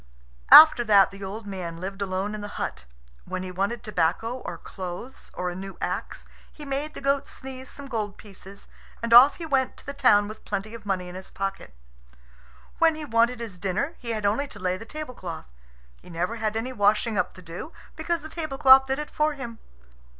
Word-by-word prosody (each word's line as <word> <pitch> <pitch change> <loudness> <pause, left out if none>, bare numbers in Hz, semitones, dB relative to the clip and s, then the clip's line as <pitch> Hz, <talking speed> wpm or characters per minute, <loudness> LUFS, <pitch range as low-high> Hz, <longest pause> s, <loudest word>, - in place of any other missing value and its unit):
After 310 -6 +10
that 200 -3 +6
the 195 0 -10
old 205 +3 -6
man 180 -4 -6
lived 195 +3 -6
alone 195 +1 -2
in 215 - -5
the 205 - -5
hut. 65 - -4 0.4
When 185 - -4
he 185 - -6
wanted 200 +6 -2
tobacco 210 +4 -1
or - - -6
clothes 185 +7 -8
or 180 0 -2
a - - -7
new 195 +1 -8
axe, - - -4 0.3
he 300 - -11
made 280 +2 -3
the - - -7
goat 275 0 +1
sneeze 260 -1 -9
some 280 -1 -10
gold 215 -5 -3
pieces, 200 -1 -13 0.4
and 230 0 +1
off 255 +4 +9
he 335 - -7
went 270 -4 0
to - - -18
the 280 - -5
town 210 -7 +4
with 215 +1 -10
plenty 205 +2 -4
of 220 -3 -10
money 185 -2 -1
in 180 - -9
his 190 +1 -9
pocket. 195 - -5 1.0
When 330 -1 +4
he 310 -1 -6
wanted 235 0 +2
his 215 -6 -7
dinner 200 - -1
he 240 - -7
had 215 -2 -2
only 225 +8 +1
to - - -12
lay 185 0 0
the 215 +4 -9
tablecloth. 245 - -7 0.6
He - - -16
never 180 +7 -2
had 220 -1 -1
any 250 +3 -3
washing 210 +1 +2
up 185 -2 -1
to 185 - -13
do, 170 - -8 0.2
because 340 -2 -2
the - - -6
tablecloth 270 -5 +5
did 265 0 0
it 300 0 -5
for 305 0 +1
him. 235 -4 -8
215 Hz, 205 wpm, -25 LUFS, 195-265 Hz, 1.0 s, After